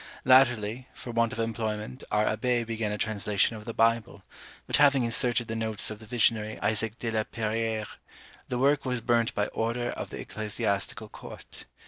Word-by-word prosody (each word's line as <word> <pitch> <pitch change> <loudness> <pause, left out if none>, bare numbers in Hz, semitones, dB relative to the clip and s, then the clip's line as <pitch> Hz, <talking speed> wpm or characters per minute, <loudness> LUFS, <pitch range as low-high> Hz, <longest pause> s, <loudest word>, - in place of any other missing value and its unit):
_ - - -14 0.2
Latterly, 125 -2 +4
for 120 - -7
want 115 0 +1
of - - -6
employment, 110 +1 -3
our 105 0 +2
Abbé 120 +2 +1
began 110 -2 -2
a 105 - -2
translation 105 0 0
of 105 -1 -9
the 115 - -5
Bible; 115 -3 -4 0.4
but - - +3
having 140 -3 +5
inserted 120 0 +1
the 115 - -3
notes 110 -1 +1
of 105 - -7
the 110 - -13
visionary 110 -2 +1
Isaac 110 +1 0
de 115 -3 -3
la 110 -1 +1
Peyrere, 110 0 -2 0.6
the 125 - -2
work 140 +3 +3
was 125 -2 -1
burnt 115 0 +1
by 105 - +1
order 120 +2 -1
of - - -6
the - - -7
ecclesiastical 105 0 -2
court. - - -11
115 Hz, 180 wpm, -28 LUFS, 110-120 Hz, 0.6 s, having